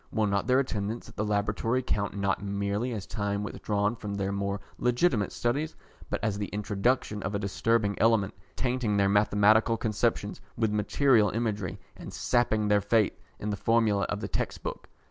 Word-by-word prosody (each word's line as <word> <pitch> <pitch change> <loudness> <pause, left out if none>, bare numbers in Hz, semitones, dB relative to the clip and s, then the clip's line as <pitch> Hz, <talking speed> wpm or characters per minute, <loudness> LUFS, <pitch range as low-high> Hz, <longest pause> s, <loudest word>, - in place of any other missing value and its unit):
Will 110 -1 +1
not 100 +1 0
their 130 0 +4
attendance 115 -4 -2
at - - -14
the 105 - -1
Laboratory 105 +4 0
count 100 -3 -1
not 100 0 0
merely 100 +4 -1
as 105 -4 -4
time 100 -1 -2
withdrawn 105 +1 -1
from 105 -3 -5
their 100 -1 -1
more 100 0 -2 0.2
legitimate 125 - +2
studies, 145 +7 -1 0.3
but - - -1
as 105 -2 0
the 100 - -2
introduction 105 +1 -1
of 105 - -3
a - - +2
disturbing 105 +1 +1
element, 110 -4 +3 0.2
tainting 120 -4 0
their 100 -1 +3
mathematical 105 +2 +4
conceptions 110 -2 -1 0.2
with 110 -2 +1
material 110 +1 +3
imagery, 105 -5 -2 0.2
and - - -9
sapping 110 -4 +1
their 105 0 +4
faith 105 +1 +2 0.2
in 105 - -3
the - - -1
formulae 110 -3 +2
of 100 - -3
the - - -3
textbook? - - -4
105 Hz, 170 wpm, -28 LUFS, 100-115 Hz, 0.3 s, their